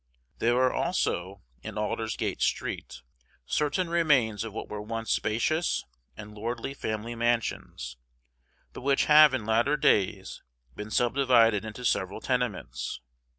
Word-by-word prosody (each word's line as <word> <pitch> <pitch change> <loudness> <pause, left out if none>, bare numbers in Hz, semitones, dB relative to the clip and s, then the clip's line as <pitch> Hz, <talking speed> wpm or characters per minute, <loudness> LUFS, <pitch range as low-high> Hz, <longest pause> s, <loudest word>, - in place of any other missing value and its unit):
There 120 +1 +2
are 130 0 +3
also, 100 - -1 0.2
in 100 - -7
Aldersgate 110 +1 -2
Street, - - -2 0.4
certain 150 - 0
remains 140 -11 +2
of 115 - -6
what 110 - -6
were 105 0 -6
once 115 +1 -4
spacious 155 +10 0 0.3
and 105 0 -9
lordly 115 +5 -4
family 110 -3 -4
mansions, 115 - -2 0.8
but - - -8
which 140 +1 +2
have 150 0 +8
in 110 - -4
latter 120 +7 +2
days 95 -5 +1 0.3
been 105 +1 -7
subdivided 120 -3 +3
into 110 +3 -7
several 100 -3 0
tenements. 125 -6 -2
115 Hz, 125 wpm, -28 LUFS, 105-130 Hz, 0.8 s, have